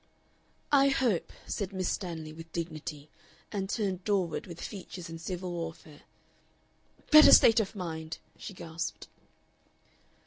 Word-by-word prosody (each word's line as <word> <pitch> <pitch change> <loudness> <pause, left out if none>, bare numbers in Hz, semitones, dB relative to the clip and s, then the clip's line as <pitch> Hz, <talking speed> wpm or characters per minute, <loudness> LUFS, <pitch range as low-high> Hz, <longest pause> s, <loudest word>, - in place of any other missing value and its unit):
"I 275 -1 +6
hope," 250 -9 +1
said 200 -2 -3
Miss 185 -2 -2
Stanley, 160 -5 -4
with 165 +1 -11
dignity, 155 -3 -5 0.4
and 195 -2 -3
turned 195 -5 -1
doorward 190 -5 0
with 170 -2 -9
features 180 -4 -7
in 165 - -7
civil 180 +1 -4
warfare. 165 -3 -7 1.1
"Better 305 0 +10
state 230 0 +8
of 215 0 -2
mind," 160 -4 -5 0.2
she 195 - -9
gasped.... 165 -1 -5
180 Hz, 125 wpm, -30 LUFS, 165-200 Hz, 1.1 s, Better